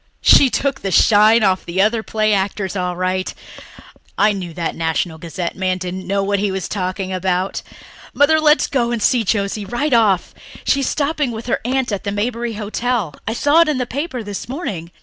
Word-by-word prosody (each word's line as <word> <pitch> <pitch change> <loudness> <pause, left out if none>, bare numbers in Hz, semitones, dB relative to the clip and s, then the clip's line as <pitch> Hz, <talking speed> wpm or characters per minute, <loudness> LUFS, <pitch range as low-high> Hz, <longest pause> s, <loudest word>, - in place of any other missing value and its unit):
She 275 - +7
took 270 +5 -1
the 195 - -2
shine 215 +4 +5
off 190 -2 +2
the 175 +2 -4
other 220 +3 +3
play 215 -1 0
actors 195 -1 -1
all 180 -1 -2
right. 185 +1 -1 0.9
I 210 0 +4
knew 185 -4 -5
that 170 -2 -2
National 160 0 -2
Gazette 170 +1 -5
man 185 -1 -1
didn't 185 0 -6
know 200 +1 0
what 200 0 0
he 205 0 0
was 190 -2 -3
talking 185 -1 -3
about. 185 0 -1 0.5
Mother, 315 +2 +4
let 305 0 +4
us - - +2
go 240 -4 0
and 240 -1 -1
see 235 +2 +2
Josie 200 0 -1
right 240 +8 -2
off. 210 -6 +2 0.3
She's 275 -2 +1
stopping 295 -1 -1
with 225 0 -7
her 245 - 0
aunt 260 0 -1
at 200 - -3
the 200 - -2
Maberly 230 +2 -2
Hotel 215 -3 -2
I 225 - 0
saw 290 +7 +4
it 335 - +3
in 295 - 0
the 250 - -1
paper 265 -1 -4
this 205 +2 -6
morning. 205 - -5
205 Hz, 200 wpm, -19 LUFS, 185-245 Hz, 0.9 s, She